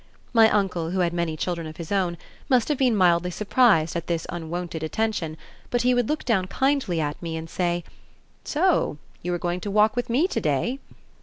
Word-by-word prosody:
My 225 Hz, -2 st, +7 dB
uncle, 190 Hz, -6 st, 0 dB
who 185 Hz, +1 st, 0 dB
had 170 Hz, -1 st, +1 dB
many 170 Hz, -2 st, -1 dB
children 170 Hz, -1 st, -3 dB
of 155 Hz, 0 st, -10 dB
his 170 Hz, +1 st, -7 dB
own, 185 Hz, -4 st, 0 dB, 0.3 s
must 255 Hz, -1 st, +3 dB
have 295 Hz, -, +1 dB
been 250 Hz, -4 st, +3 dB
mildly 180 Hz, -2 st, +3 dB
surprised 195 Hz, -4 st, +3 dB
at 170 Hz, -1 st, -3 dB
this 170 Hz, -2 st, -1 dB
unwonted 170 Hz, -1 st, -4 dB
attention, 165 Hz, -2 st, -2 dB, 0.3 s
but 245 Hz, -1 st, 0 dB
he 250 Hz, 0 st, +4 dB
would 245 Hz, -2 st, +1 dB
look 305 Hz, +1 st, -1 dB
down 195 Hz, -6 st, +1 dB
kindly 265 Hz, -, 0 dB
at 150 Hz, -1 st, -3 dB
me, 165 Hz, -2 st, -4 dB
and 160 Hz, 0 st, -6 dB
say, 175 Hz, 0 st, -1 dB, 0.6 s
"So 325 Hz, -, +1 dB, 0.2 s
you 180 Hz, -, -3 dB
are 175 Hz, -, 0 dB
going 175 Hz, +1 st, -2 dB
to 205 Hz, -, -4 dB
walk 210 Hz, +1 st, +3 dB
with 245 Hz, -1 st, -2 dB
me 275 Hz, +10 st, +3 dB
to -, -, -1 dB
day?" 155 Hz, -, 0 dB
180 Hz, 205 wpm, -25 LUFS, 170-230 Hz, 0.6 s, My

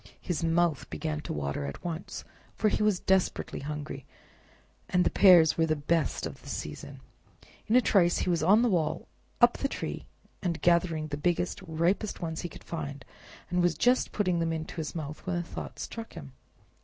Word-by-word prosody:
His 175 Hz, -2 st, -3 dB
mouth 165 Hz, -2 st, +1 dB
began 155 Hz, -2 st, -3 dB
to -, -, -6 dB
water 70 Hz, -1 st, -2 dB
at 70 Hz, -, -8 dB
once, 170 Hz, +1 st, -5 dB, 0.3 s
for 215 Hz, -, +2 dB
he -, -, -1 dB
was 210 Hz, -4 st, +3 dB
desperately 190 Hz, -1 st, 0 dB
hungry, 150 Hz, -1 st, -5 dB, 0.9 s
and 180 Hz, 0 st, +3 dB
the -, -, +1 dB
pears 175 Hz, -5 st, +6 dB
were 160 Hz, -, +3 dB
the 155 Hz, -, +2 dB
best 160 Hz, +2 st, 0 dB
of -, -, -7 dB
the -, -, -11 dB
season. -, -, -6 dB, 0.7 s
In 220 Hz, -, +2 dB
a 250 Hz, -, +7 dB
trice 180 Hz, -6 st, +3 dB
he -, -, -1 dB
was 170 Hz, -, +1 dB
on 205 Hz, +8 st, +5 dB
the 245 Hz, -, +3 dB
wall, 165 Hz, -4 st, 0 dB, 0.3 s
up 240 Hz, 0 st, +5 dB
the 275 Hz, -, +1 dB
tree, -, -, -5 dB, 0.3 s
and 175 Hz, -4 st, -1 dB
gathering 170 Hz, -3 st, +2 dB
the 145 Hz, -, -3 dB
biggest 175 Hz, +5 st, 0 dB
and 160 Hz, -4 st, -8 dB
ripest 195 Hz, +5 st, +1 dB
one 165 Hz, -2 st, -3 dB
he 175 Hz, -, -4 dB
could -, -, -12 dB
find, 145 Hz, -5 st, -6 dB, 0.5 s
was 175 Hz, -1 st, +2 dB
just 250 Hz, +1 st, +3 dB
putting 180 Hz, -5 st, +1 dB
it 165 Hz, 0 st, 0 dB
into 160 Hz, +1 st, -5 dB
his 160 Hz, 0 st, -4 dB
mouth 150 Hz, -2 st, -6 dB
when 185 Hz, -, 0 dB
a 175 Hz, -, -1 dB
thought -, -, -7 dB
struck 225 Hz, -1 st, -7 dB
him. 70 Hz, -2 st, -9 dB
170 Hz, 190 wpm, -29 LUFS, 155-185 Hz, 0.9 s, a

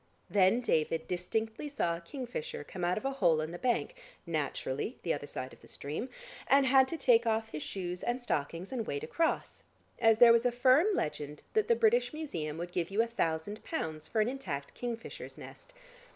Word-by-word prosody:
Then 200 Hz, +4 st, +4 dB
David 160 Hz, -6 st, 0 dB
distinctly 220 Hz, +9 st, -2 dB
saw 170 Hz, -12 st, 0 dB
a 170 Hz, -, -8 dB
kingfisher 280 Hz, -, -5 dB
come 180 Hz, -, -7 dB
out 175 Hz, +1 st, +1 dB
of 215 Hz, -, -4 dB
a 270 Hz, -, +1 dB
hole 175 Hz, -12 st, +3 dB
in 155 Hz, +1 st, -3 dB
the 175 Hz, -, -7 dB
bank 255 Hz, -, 0 dB, 0.3 s
(naturally 155 Hz, -, -2 dB
the 170 Hz, -, +1 dB
other 145 Hz, 0 st, -5 dB
side 130 Hz, -2 st, -5 dB
of -, -, -17 dB
the -, -, -16 dB
stream) 155 Hz, -, -5 dB, 0.4 s
and 275 Hz, 0 st, +5 dB
had 265 Hz, 0 st, +6 dB
to 330 Hz, -, -3 dB
take 240 Hz, -5 st, +4 dB
off 220 Hz, 0 st, +1 dB
his 150 Hz, -, -5 dB
shoes 180 Hz, 0 st, -4 dB
and 240 Hz, +1 st, -1 dB
stockings 170 Hz, -, -3 dB
and 235 Hz, -4 st, -3 dB
wade 430 Hz, -, -3 dB
across, 335 Hz, -9 st, -1 dB, 0.4 s
as 225 Hz, -2 st, +5 dB
there 235 Hz, 0 st, +9 dB
was 230 Hz, 0 st, +4 dB
a -, -, +1 dB
firm 255 Hz, -, +5 dB
legend 150 Hz, 0 st, -3 dB
that 435 Hz, -1 st, +2 dB
the 470 Hz, -, +5 dB
British 455 Hz, -3 st, +3 dB
Museum 165 Hz, -, -4 dB
would 175 Hz, +1 st, -5 dB
give 175 Hz, -2 st, -1 dB
you 210 Hz, +3 st, +2 dB
a -, -, -1 dB
thousand 205 Hz, -2 st, -2 dB
pounds 155 Hz, -, -4 dB
for 220 Hz, -, +1 dB
an 215 Hz, -, +2 dB
intact 165 Hz, -, -4 dB
kingfisher's 235 Hz, -2 st, -6 dB
nest. -, -, -12 dB
220 Hz, 200 wpm, -32 LUFS, 165-260 Hz, 0.4 s, there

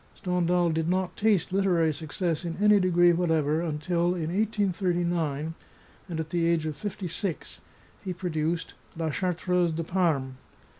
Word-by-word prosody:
Stendhal 180 Hz, -1 st, +1 dB
did 160 Hz, +1 st, -1 dB
not 185 Hz, 0 st, 0 dB
taste 205 Hz, -4 st, +1 dB
literary 175 Hz, -5 st, +2 dB
success 160 Hz, +3 st, -3 dB
in 170 Hz, -1 st, -4 dB
any 210 Hz, 0 st, +5 dB
degree 175 Hz, -1 st, +4 dB
whatever 160 Hz, -3 st, +1 dB
until, 170 Hz, +2 st, 0 dB
in 165 Hz, -2 st, -3 dB
183^, 175 Hz, -7 st, 0 dB, 0.6 s
and 165 Hz, -2 st, -3 dB
at 160 Hz, -1 st, -4 dB
the 170 Hz, -1 st, +1 dB
age 165 Hz, -2 st, +1 dB
of 155 Hz, -1 st, -3 dB
fifty 195 Hz, +1 st, -5 dB
six, 170 Hz, 0 st, -4 dB, 0.4 s
he 190 Hz, -, -3 dB
produced 165 Hz, -2 st, -2 dB
" -, -, -22 dB
La 160 Hz, -1 st, -1 dB
Chartreuse 180 Hz, 0 st, 0 dB
de 165 Hz, +1 st, -2 dB
Parme." 155 Hz, -7 st, 0 dB
170 Hz, 150 wpm, -27 LUFS, 160-180 Hz, 0.6 s, any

